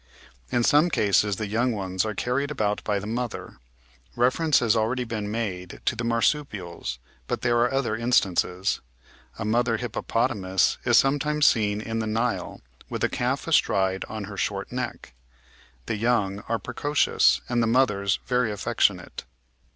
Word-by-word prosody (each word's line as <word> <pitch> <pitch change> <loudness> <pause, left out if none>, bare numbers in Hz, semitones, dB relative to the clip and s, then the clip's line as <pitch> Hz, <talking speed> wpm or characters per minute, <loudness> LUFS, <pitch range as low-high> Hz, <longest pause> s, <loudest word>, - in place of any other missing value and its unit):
In 120 - +2
some 150 +7 +4
cases 105 - +2
the 110 - -3
young 115 +4 0
ones 95 -2 -2
are 105 - -4
carried 130 +6 -1
about 105 -8 -1
by 105 -1 0
the 100 - -5
mother. 115 - -4 0.6
Reference 130 +6 +3
has 115 -2 +2
already 115 +3 0
been 110 -3 -4
made 95 -5 -4
to 120 - +1
the 120 - -4
marsupials, 115 - -1 0.3
but - - -2
there 120 -1 +2
are 120 +1 +2
other 135 -5 0
instances. 100 -5 +1 0.6
A 110 - -4
mother 115 +1 +1
hippopotamus 105 -5 0
is 120 -1 +5
sometimes 145 +2 +2
seen 105 -2 +3
in 115 +1 -3
the 110 - -2
Nile 115 +2 -2 0.3
with - - -4
a - - +3
calf - - -2
astride 95 0 +2
on 110 -1 -5
her 100 0 -8
short - - -2
neck: - - -5 0.7
the 110 - -2
young 105 -4 +1
are 115 - +1
precocious, 145 +7 +2
and 120 -1 +1
the 115 - +2
mothers 105 -6 +2
very 125 -3 +1
affectionate. 100 -9 -1
115 Hz, 155 wpm, -25 LUFS, 100-125 Hz, 0.7 s, is